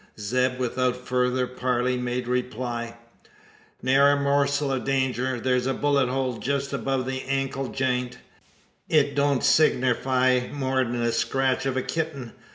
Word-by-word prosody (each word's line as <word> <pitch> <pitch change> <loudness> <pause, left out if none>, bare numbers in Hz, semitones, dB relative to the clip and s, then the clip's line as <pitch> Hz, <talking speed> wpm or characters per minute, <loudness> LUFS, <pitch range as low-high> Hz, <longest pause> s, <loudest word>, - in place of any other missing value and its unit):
Zeb 125 +5 0
without 125 0 0
further 125 0 0
parley, 125 0 -1
made 125 0 -3
reply: 120 -1 -3 0.9
"Ne'er 140 +2 +5
a 140 - 0
morsel 140 0 +1
o' 135 - 0
danger. 130 -1 -1
Thur's 125 +1 0
a 135 - 0
bullet 140 -3 +1
hole 130 -2 -2
jest 140 0 -2
above 135 -2 -1
the 130 0 -3
ankle 135 0 -1
jeint. 125 -2 -1 0.7
It 145 -2 +3
don't 140 -2 +1
signerfy 130 -3 +2
more'n 130 -3 -1
the 120 0 +1
scratch 135 +2 0
o' 135 - 0
a 130 - 0
kitting. 155 -7 -4
130 Hz, 140 wpm, -25 LUFS, 125-135 Hz, 0.9 s, Ne'er